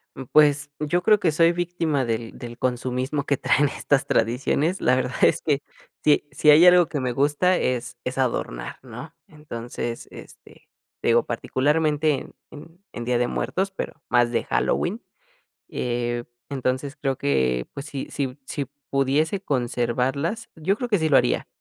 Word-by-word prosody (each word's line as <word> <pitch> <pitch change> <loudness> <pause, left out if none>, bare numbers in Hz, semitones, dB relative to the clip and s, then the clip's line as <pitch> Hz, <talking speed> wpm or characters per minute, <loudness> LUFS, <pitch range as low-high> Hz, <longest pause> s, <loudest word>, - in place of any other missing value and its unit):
Mm, 135 - -6
pues 145 -1 +4
yo 155 +4 0
creo 215 -1 +5
que 170 -5 +2
soy 165 +2 +4
víctima 170 -5 -1
del 115 0 -3
del 120 -1 -8
consumismo 130 +3 -2
que 140 - +1
traen 145 +3 +2
estas 140 0 0
tradiciones. 140 - +1
La 125 - +4
verdad 130 0 -2
es - - +4
que, 145 -2 0 0.4
si 150 -1 +3
si 145 +2 +2
hay 155 +4 +8
algo 180 -1 +7
que 150 - -3
me 130 -1 -1
gusta 145 +8 +2
es 125 -1 -2
es 125 +1 -4
adornar, 120 - -2
¿no? - - -9
Entonces, 120 -5 -6
este, - - -14 0.3
te - - -2
digo 115 0 +4
particularmente 150 +5 +1
en 135 - -6 0.2
en 165 +5 -13
en 120 - -5
Día 125 0 +1
de 120 0 +1
Muertos, 190 +9 -2
pero 190 - -5 0.2
más 120 -1 +3
de 120 - 0
Halloween, 215 +7 0 0.7
eh, 120 -1 -2 0.3
entonces, 135 +1 -2
creo 135 -2 -2
que, 65 -3 0
pues, 140 - -7
si 140 -3 -5
si 135 -2 -3
si 140 0 -3 0.2
pudiese 145 +7 +1
conservarlas, 130 - -1
yo 185 +6 0
creo 245 - -3
que 210 - +3
sí 160 -2 0
lo 140 - +6
haría, 125 - +1
140 Hz, 165 wpm, -24 LUFS, 125-155 Hz, 0.7 s, hay